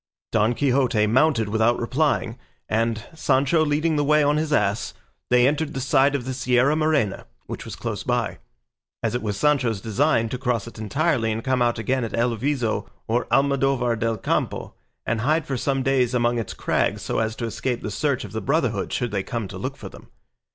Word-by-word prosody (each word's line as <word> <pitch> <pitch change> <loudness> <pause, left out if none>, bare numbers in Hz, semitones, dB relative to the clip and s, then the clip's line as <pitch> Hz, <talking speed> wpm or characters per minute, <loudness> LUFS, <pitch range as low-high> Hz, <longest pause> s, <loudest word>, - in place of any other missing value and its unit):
Don 110 +2 +2
Quixote 130 -5 +2
mounted 120 0 +3
without 110 +3 +2
replying, 130 -1 0 0.3
and, 115 0 0
Sancho 145 +1 +2
leading 155 +1 +1
the 145 - +2
way 150 +1 +4
on 145 +1 +2
his 155 0 -1
ass, 105 -6 0 0.3
they 125 0 +5
entered 150 +1 -1
the - - -2
side 135 +2 +3
of 125 -4 -3
the 130 - -3
Sierra 130 +2 +2
Morena, 155 -10 0 0.2
which - - -7
was - - -7
close - - -4
by, - - -1 0.6
as - - 0
it 120 - -1
was 105 -2 -3
Sancho's 125 -5 +2
design 115 +3 +1
to 125 - -4
cross 125 -5 -1
it 115 - -10
entirely 125 0 0
and 110 +1 -3
come 130 -1 0
out 120 -1 +2
again 125 +3 0
at 115 - -4
El 120 0 +1
Viso 125 -1 -1 0.2
or 120 +2 0
Almodovar 135 -2 +2
del 115 0 -1
Campo, - - -2 0.3
and 115 -1 -1
hide 155 +4 +1
for 135 - -3
some 135 +1 0
days 130 -2 +2
among 120 0 +1
its 110 - -5
crags - - 0
so - - -1
as 110 0 -1
to 115 - -4
escape 120 +2 -3
the 105 - -3
search 135 +6 -1
of - - -10
the 110 +1 -4
Brotherhood 120 - 0
should 120 -3 -1
they 100 -2 -1
come 115 +1 -4
to - - -7
look - - -4
for - - -8
them. - - -14
125 Hz, 200 wpm, -23 LUFS, 115-140 Hz, 0.6 s, they